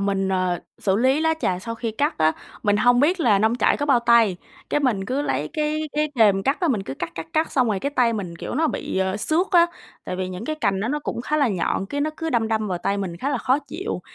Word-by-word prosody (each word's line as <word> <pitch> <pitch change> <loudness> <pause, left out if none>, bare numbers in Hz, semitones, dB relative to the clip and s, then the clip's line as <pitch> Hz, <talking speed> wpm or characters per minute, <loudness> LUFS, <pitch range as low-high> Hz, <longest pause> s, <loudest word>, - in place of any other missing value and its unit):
mình, 195 -1 0
ờ, 185 -2 0 0.2
xử 195 -1 +1
lý 260 +6 +3
lá 320 0 +2
trà 180 -1 0
sau 230 +4 -5
khi 230 -1 -3
cắt 285 - -1
á, 155 0 +4 0.3
mình 205 -1 +2
hông 245 +3 +4
biết 340 +5 +2
là 215 -8 +4
nông 220 +4 +2
trại - - +3
có 290 - -2
bao 260 -4 +4
tay, 235 -5 +4 0.3
cái 295 - +1
mình 220 -8 0
cứ 270 +6 -1
lấy 145 - -1
cái 305 0 -1
cái 300 0 0
kềm 205 -5 +4
cắt 275 - 0
á, 345 - +1
mình 215 -8 0
cứ 135 - -6
cắt, - - -5
cắt, 165 - -6
cắt 315 0 +1
xong 250 -4 +2
rồi 200 -3 0
cái 280 - -2
tay 245 -4 +2
mình, 180 -6 -5
kiểu, - - -6
nó 320 +3 +2
bị - - -3
à 190 +1 0
xước 320 - +1
á, 345 -3 +6 0.4
tại 180 - -4
vì 185 0 -3
những 185 +4 -6
cái 310 +3 -3
cành 200 -9 0
đó 220 - -1
nó 295 +3 0
cũng 260 - -4
khá 300 +5 -1
là 280 -5 +3
nhọn, 190 0 -1
cái 285 - -3
nó 310 +2 0
cứ 325 0 -3
đâm 225 -2 +1
đâm 215 -2 -1
vào 180 -2 -2
tay 200 +3 -1
mình 180 -4 -4
khá 265 +10 -3
là 280 - 0
khó 260 +4 +2
chịu. 335 +7 -5
230 Hz, 285 wpm, -23 LUFS, 195-290 Hz, 0.4 s, á